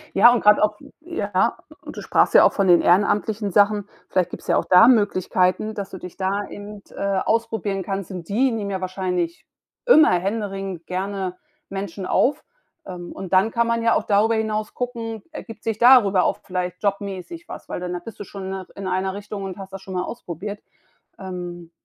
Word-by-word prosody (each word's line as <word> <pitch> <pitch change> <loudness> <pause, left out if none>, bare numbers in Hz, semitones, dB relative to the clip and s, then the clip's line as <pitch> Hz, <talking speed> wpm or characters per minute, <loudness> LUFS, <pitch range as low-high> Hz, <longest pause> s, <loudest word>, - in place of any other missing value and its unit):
Ja, 235 +5 +8
und 245 - +2
grade 210 0 +5
auch 210 0 +1 0.2
ja, 220 - -1 0.3
du - - -9
sprachst - - +2
ja - - +9
auch - - +4
von 195 -2 +1
den 175 -1 +7
ehrenamtlichen 205 +3 +2
Sachen. 205 +1 +3 0.2
Vielleicht 185 -2 +1
gibt's - - -9
ja - - +3
auch - - +2
da 180 +5 +7
Möglichkeiten, 200 -3 +2
dass 200 -2 -5
du 190 - -8
dich 180 0 -10
da 195 +2 -2
eben, 205 0 -9
äh, 200 -1 -1
ausprobieren 220 -4 -1
kannst. 195 -1 -4
Und 180 -3 -7
die 255 +6 +2
nehmen 210 -3 -3
ja 190 - -2
wahrscheinlich 180 -2 -3 0.4
immer 315 -10 +7
händeringend 195 -2 -3
gerne 190 0 -3 0.3
Menschen 195 -1 -5
auf. 285 +9 +1 0.4
Ähm, 175 -2 -8
und 190 -1 -7
dann 195 +4 +4
kann 235 0 +1
man 230 0 0
ja 230 - +4
auch - - +1
darüber 215 +2 +3
hinaus 215 -1 -2
gucken, 230 -3 -4
ergibt 230 -7 -9
sich 225 -2 -2
darüber 230 -7 +6
auch - - +1
vielleicht 180 -1 -4
jobmäßig 200 - -4
was, - - -9
weil - - -5
dann 180 0 -4
da 180 - -3
bist 215 +5 -11
du - - -6
schon 195 0 -9
in - - -4
'ner 190 -1 -6
in 195 - -5
einer 190 +1 -1
Richtung 205 0 -6
und 190 -2 -6
hast 195 -1 -10
das 195 - -7
schon 190 -1 -8
mal 180 - 0
ausprobiert. 205 -1 -6 0.6
Ähm, 175 -2 -7
200 Hz, 200 wpm, -22 LUFS, 185-215 Hz, 0.6 s, ja